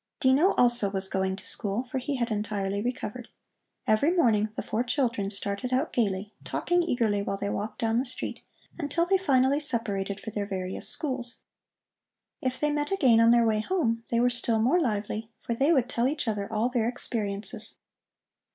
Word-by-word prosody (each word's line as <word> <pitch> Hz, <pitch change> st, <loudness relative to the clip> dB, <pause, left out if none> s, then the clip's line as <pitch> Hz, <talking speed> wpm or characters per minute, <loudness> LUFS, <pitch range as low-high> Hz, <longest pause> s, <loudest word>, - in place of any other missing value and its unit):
Dino 275 Hz, +9 st, +4 dB
also 240 Hz, -4 st, +3 dB
was 190 Hz, -1 st, +2 dB
going 190 Hz, 0 st, -1 dB
to -, -, -9 dB
school, 210 Hz, +2 st, -2 dB
for 260 Hz, +1 st, -4 dB
he 275 Hz, +3 st, -3 dB
had 240 Hz, -2 st, -1 dB
entirely 205 Hz, -2 st, -2 dB
recovered. 245 Hz, 0 st, -4 dB, 0.6 s
Every 215 Hz, +8 st, +3 dB
morning 230 Hz, -, +3 dB
the -, -, -3 dB
four 230 Hz, -, -1 dB
children 240 Hz, -6 st, 0 dB
started 200 Hz, +4 st, -3 dB
out 260 Hz, +5 st, 0 dB
gaily, 205 Hz, -3 st, -1 dB
talking 350 Hz, 0 st, 0 dB
eagerly 230 Hz, -11 st, +1 dB
while 195 Hz, 0 st, -2 dB
they 200 Hz, 0 st, -2 dB
walked 210 Hz, +1 st, -4 dB
down 225 Hz, 0 st, +2 dB
the 260 Hz, -, -1 dB
street, 255 Hz, -, -4 dB, 0.4 s
until 325 Hz, +2 st, 0 dB
they 385 Hz, +2 st, +2 dB
finally 270 Hz, -4 st, +3 dB
separated 205 Hz, -8 st, -1 dB
for 220 Hz, -, -7 dB
their 205 Hz, -1 st, -3 dB
various 185 Hz, -1 st, -2 dB
schools. 255 Hz, -6 st, -1 dB, 1.0 s
If 255 Hz, -1 st, -2 dB
they 300 Hz, 0 st, +1 dB
met 295 Hz, 0 st, -1 dB
again 260 Hz, -12 st, +4 dB
on 230 Hz, 0 st, +6 dB
their 235 Hz, 0 st, +5 dB
way 215 Hz, -1 st, +2 dB
home, 230 Hz, -, 0 dB
they 235 Hz, -, +1 dB
were 245 Hz, +1 st, +3 dB
still 240 Hz, -2 st, +1 dB
more 255 Hz, +11 st, +3 dB
lively, 215 Hz, -2 st, -2 dB
for 235 Hz, -, -3 dB
they 275 Hz, +7 st, +2 dB
would 260 Hz, -7 st, +3 dB
tell 245 Hz, -1 st, 0 dB
each 290 Hz, -2 st, -2 dB
other 205 Hz, -2 st, -2 dB
all 220 Hz, +2 st, +1 dB
their 240 Hz, -2 st, 0 dB
experiences. 210 Hz, -5 st, -2 dB
235 Hz, 185 wpm, -27 LUFS, 210-260 Hz, 1.0 s, on